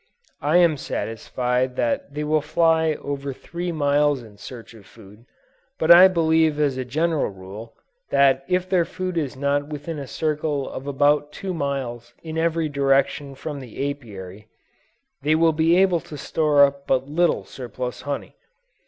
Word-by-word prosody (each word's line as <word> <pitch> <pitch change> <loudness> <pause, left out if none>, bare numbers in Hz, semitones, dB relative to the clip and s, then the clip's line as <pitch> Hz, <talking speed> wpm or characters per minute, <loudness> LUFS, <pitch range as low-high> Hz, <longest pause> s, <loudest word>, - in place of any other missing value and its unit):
I 150 +4 +3
am 170 -4 +4
satisfied 125 +2 -2
that 125 +4 -2
they 150 - -2
will 155 0 +1
fly 160 +1 +2
over 140 -1 -4
three 175 +6 -5
miles 145 -3 +1
in 105 -2 -15
search 115 -2 -10
of 110 -4 -16
food, 110 +2 -17 0.5
but 160 +1 +3
I 180 +2 +10
believe 160 -3 +2
as 145 -3 +1
a 130 - -3
general 155 +5 0
rule, 100 +4 -10 0.3
that 135 -1 +3
if 180 0 +1
their 185 -2 +2
food 185 +2 -5
is 145 -6 -2
not 140 +1 0
within 150 +1 -6
a 140 - -6
circle 150 -1 -2
of 135 - -7
about 145 +1 +2
two 190 +3 -5
miles 130 -6 -4
in 160 -1 -6
every 165 -1 +1
direction 140 0 +1
from 145 +1 -6
the 135 +2 -4
Apiary, 105 -6 -10 0.7
they 150 +3 +2
will 165 0 +3
be 165 +2 +3
able 185 -2 +4
to 150 - -10
store 150 -1 +3
up 140 0 -5
but 130 0 +1
little 170 +4 +1
surplus 125 -1 -6
honey. 145 -1 -5
145 Hz, 160 wpm, -23 LUFS, 130-160 Hz, 0.7 s, I